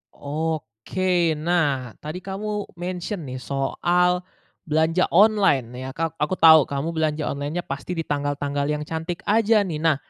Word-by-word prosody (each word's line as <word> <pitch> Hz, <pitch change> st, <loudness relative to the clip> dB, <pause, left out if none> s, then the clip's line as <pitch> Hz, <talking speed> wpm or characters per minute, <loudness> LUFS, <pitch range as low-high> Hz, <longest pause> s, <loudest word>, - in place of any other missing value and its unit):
Oke. 160 Hz, +3 st, -1 dB
Nah, 150 Hz, -6 st, 0 dB
tadi 155 Hz, +4 st, -6 dB
kamu 205 Hz, +1 st, -4 dB
mention 180 Hz, 0 st, -4 dB
nih 130 Hz, 0 st, -6 dB
soal 175 Hz, +7 st, +1 dB, 0.4 s
belanja 160 Hz, +3 st, +2 dB
online 195 Hz, -, +4 dB
ya, 130 Hz, 0 st, -5 dB
ka 165 Hz, 0 st, -1 dB
aku 150 Hz, +5 st, 0 dB
tahu 160 Hz, -4 st, +7 dB
kamu 140 Hz, +4 st, -2 dB
belanja 155 Hz, -2 st, -1 dB
online-nya 145 Hz, +5 st, -3 dB
pasti 140 Hz, +6 st, -5 dB
di 165 Hz, -, -2 dB
tanggal-tanggal 145 Hz, -1 st, -2 dB
yang 150 Hz, 0 st, -1 dB
cantik 160 Hz, +3 st, -5 dB
aja 215 Hz, 0 st, +4 dB
nih. 165 Hz, -6 st, -4 dB
Nah 160 Hz, -1 st, +3 dB
160 Hz, 145 wpm, -23 LUFS, 145-180 Hz, 0.4 s, tahu